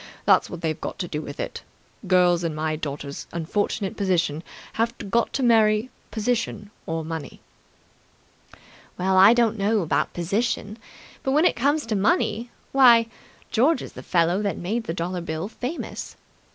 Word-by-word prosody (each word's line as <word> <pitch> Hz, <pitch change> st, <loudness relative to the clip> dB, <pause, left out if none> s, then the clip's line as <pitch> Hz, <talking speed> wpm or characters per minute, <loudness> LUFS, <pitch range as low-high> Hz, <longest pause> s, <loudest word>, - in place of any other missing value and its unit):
That's -, -, +4 dB
what 175 Hz, -, -7 dB
they've 160 Hz, -2 st, -2 dB
got -, -, -5 dB
to 175 Hz, -, -3 dB
do 150 Hz, -2 st, -4 dB
with 145 Hz, -1 st, -8 dB
it. -, -, -4 dB, 0.5 s
Girls 180 Hz, -2 st, +4 dB
in 165 Hz, -2 st, -2 dB
my 155 Hz, 0 st, -1 dB
daughter's 145 Hz, -2 st, -6 dB
unfortunate 190 Hz, +4 st, -2 dB
position 170 Hz, -6 st, 0 dB, 0.3 s
have 230 Hz, +1 st, 0 dB, 0.2 s
got 235 Hz, +2 st, +2 dB
to 270 Hz, -, -1 dB
marry 220 Hz, 0 st, +3 dB, 0.2 s
position 220 Hz, -2 st, -2 dB, 0.2 s
or 165 Hz, -1 st, -3 dB
money." 160 Hz, -3 st, -6 dB, 1.6 s
"Well, 190 Hz, +1 st, +1 dB
I 195 Hz, +5 st, +8 dB
don't 225 Hz, -3 st, +2 dB
know 210 Hz, +2 st, +2 dB
about 165 Hz, -, 0 dB
position, 210 Hz, +4 st, -2 dB, 0.4 s
but 265 Hz, -, -1 dB
when 305 Hz, +4 st, +4 dB
it -, -, +3 dB
comes 285 Hz, +5 st, +1 dB
to 225 Hz, -2 st, -1 dB
money 210 Hz, +3 st, +1 dB, 0.2 s
why, 235 Hz, -4 st, +6 dB, 0.4 s
George 265 Hz, +5 st, +3 dB
is -, -, -9 dB
the -, -, -9 dB
fellow 175 Hz, +2 st, +1 dB
that 200 Hz, -2 st, -1 dB
made 220 Hz, +6 st, -2 dB
the 165 Hz, -, -3 dB
dollar 180 Hz, +1 st, -3 dB
bill 160 Hz, +2 st, -4 dB
famous. 250 Hz, +8 st, -6 dB
200 Hz, 160 wpm, -24 LUFS, 170-230 Hz, 1.6 s, I